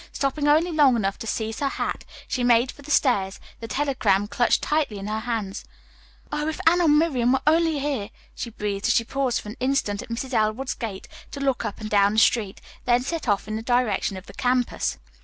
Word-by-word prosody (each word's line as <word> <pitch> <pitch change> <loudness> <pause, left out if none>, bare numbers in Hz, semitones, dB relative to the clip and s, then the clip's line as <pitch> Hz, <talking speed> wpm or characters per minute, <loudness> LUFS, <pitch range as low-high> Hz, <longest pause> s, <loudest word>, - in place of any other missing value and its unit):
Stopping 285 +2 -1
only 315 +4 +4
long 290 -5 +5
enough 195 -3 -1
to 225 - -6
seize 220 0 -3
her 280 - 0
hat, - - -3 0.2
she 250 - -2
made 245 +1 +4
for - - -16
the 285 - -13
stairs, 205 -10 +2 0.2
the 230 - -7
telegram 250 -7 +1
clutched 215 +3 +1
tightly 295 -8 0
in 195 - -6
her 215 +1 -2
hand. 220 -4 -3 0.7
"Oh, 300 0 -2
if 315 - -3
Anne 345 +2 +5
or 340 - +3
Miriam 290 -5 +3
were 265 - +1
only 320 0 +3
here," 275 -7 -2 0.2
she 235 - -5
breathed, 205 -2 -3
as - - +3
she 230 - +3
paused 265 +1 -1
for 210 - -9
an 215 - -9
instant 255 -6 0
at - - -11
Mrs. 250 +3 -4
Elwood's 220 +4 0
gate 210 -5 -6 0.2
to 280 - -7
look 270 -4 0
up 210 - -5
and 215 - -5
down 205 -1 +3
the - - -2
street, 215 -4 +2 0.2
then 245 0 +3
set 320 +1 -4
off 205 -1 +1
in 215 0 -3
the - - -4
direction 225 -5 0
of 185 - -10
the - - -12
campus. 250 -1 0
245 Hz, 220 wpm, -24 LUFS, 215-275 Hz, 0.7 s, long